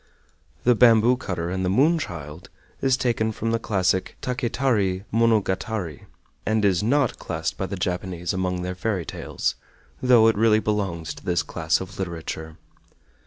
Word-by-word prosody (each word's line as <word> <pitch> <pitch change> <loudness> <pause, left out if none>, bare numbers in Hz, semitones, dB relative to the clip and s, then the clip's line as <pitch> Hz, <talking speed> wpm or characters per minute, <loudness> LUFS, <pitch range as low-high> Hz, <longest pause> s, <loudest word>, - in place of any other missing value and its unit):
"The 125 - +5
Bamboo 115 +1 +5
cutter 90 -8 -3
and 95 0 -2
the 90 - +1
Moon 150 - +3
child" 80 - -7 0.3
is 135 -1 +3
taken 115 -4 0
from 115 +1 -2
the 115 - +1
classic 95 -4 0
"Taketari 120 -7 0
Monogatari," 110 -6 0 0.4
and 110 -1 +1
is 95 -3 +3
NOT 130 +4 +1
classed 80 +1 -3
by 95 - -3
the 100 - -4
Japanese 90 0 -2
among 90 -1 -1
their 90 0 -3
fairy 90 -2 -2
tales, - - -3 0.5
though 125 -3 +6
it 115 - +4
really 110 0 +4
belongs 95 -8 -2
to - - -14
this 90 -3 +1
class 80 -1 0
of 95 0 -8
literature. 80 -3 -5
100 Hz, 155 wpm, -24 LUFS, 90-115 Hz, 0.5 s, though